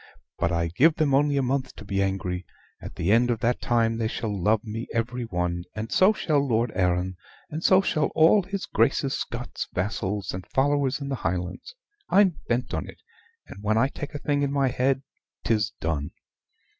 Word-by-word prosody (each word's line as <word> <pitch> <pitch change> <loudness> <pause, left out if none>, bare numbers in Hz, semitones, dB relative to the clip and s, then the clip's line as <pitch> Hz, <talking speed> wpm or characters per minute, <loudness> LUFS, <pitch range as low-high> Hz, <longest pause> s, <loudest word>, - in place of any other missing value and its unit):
But 85 0 +1
I 85 -1 0
give 150 - +4
them 150 -3 +1
only 145 +1 +3
a 135 - +2
month 130 +1 -1
to 105 - -11
be 100 -1 -1
angry; 95 -2 -2 0.4
at - - -8
the 85 - 0
end 120 +3 +4
of 120 -2 0
that 120 +1 +1
time 115 -1 +1
they 110 - +1
shall 110 -2 -3
love 105 +3 +1
me 115 +1 -5
every 120 +1 -2
one, 90 -3 -2
and 110 +1 -5
so 190 +3 +5
shall 155 -8 +1
Lord 120 -4 +1
Arran, 90 0 0 0.3
and 155 +2 -4
so 190 0 +6
shall 155 -5 +1
all 165 +6 +6
his 195 +1 -4
Grace's 135 +3 +1
Scots 120 +1 -4
vassals 100 0 -2
and 90 -1 -6
followers 140 0 +1
in 140 - -4
the 135 - -1
Highlands. 90 - -3 0.3
I'm 185 -3 +4
bent 120 +1 -1
on - - -2
it; - - -14 0.4
and 100 - -11
when 110 +1 +2
I 130 +4 +3
take 145 +1 -7
a - - -1
thing 145 0 0
in 140 -1 0
my 140 -2 +2
head, 130 +2 +1 0.4
'tis 110 -1 +1
done. 75 -3 -2
120 Hz, 195 wpm, -26 LUFS, 100-140 Hz, 0.4 s, so